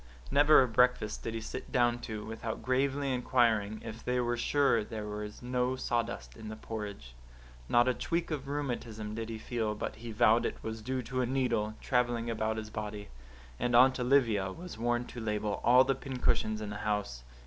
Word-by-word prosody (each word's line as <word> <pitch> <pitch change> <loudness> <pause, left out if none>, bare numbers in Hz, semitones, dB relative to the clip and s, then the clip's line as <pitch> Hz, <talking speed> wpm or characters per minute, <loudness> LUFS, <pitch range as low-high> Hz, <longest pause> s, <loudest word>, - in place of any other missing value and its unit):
Never 145 0 +7
a - - 0
breakfast 125 -2 +2
did 115 - -4
he 115 - -3
sit 130 +3 -7
down 120 -3 +2
to, 110 -3 -6
without 110 0 -5
gravely 135 +2 +1
inquiring 115 -4 +1
if 115 0 -7
they 125 0 0
were 120 0 +1
sure 130 -2 +2
there 105 0 -6
was 105 +2 -6
no 125 +1 0
sawdust 115 - -2
in 110 - -8
the 110 - -6
porridge. 105 - -7 0.6
Not 120 +1 +5
a 125 - +3
tweak 170 +6 -2
of 145 -3 -3
rheumatism 120 -7 -3
did 115 0 -4
he 115 - -4
feel 110 -1 -2
but - - -4
he 115 +1 -7
vowed 115 +1 +4
it - - -5
was 110 0 -5
due 130 +3 -2
to 130 +2 -2
a 125 - 0
needle, 120 -5 0
travelling 120 -2 0
about 110 0 -1
his 110 0 -6
body. 105 -1 -5 0.5
And 120 0 +1
Aunt 130 +2 +6
Olivia 120 -7 +3
was 180 - -8
warned 120 +2 0
to 120 - -8
label 105 -1 -2
all 125 +2 +7
the 135 - +1
pincushions 125 -5 -1
in 105 -1 -4
the 105 - -5
house. 105 -12 -2
115 Hz, 190 wpm, -31 LUFS, 110-125 Hz, 0.6 s, Never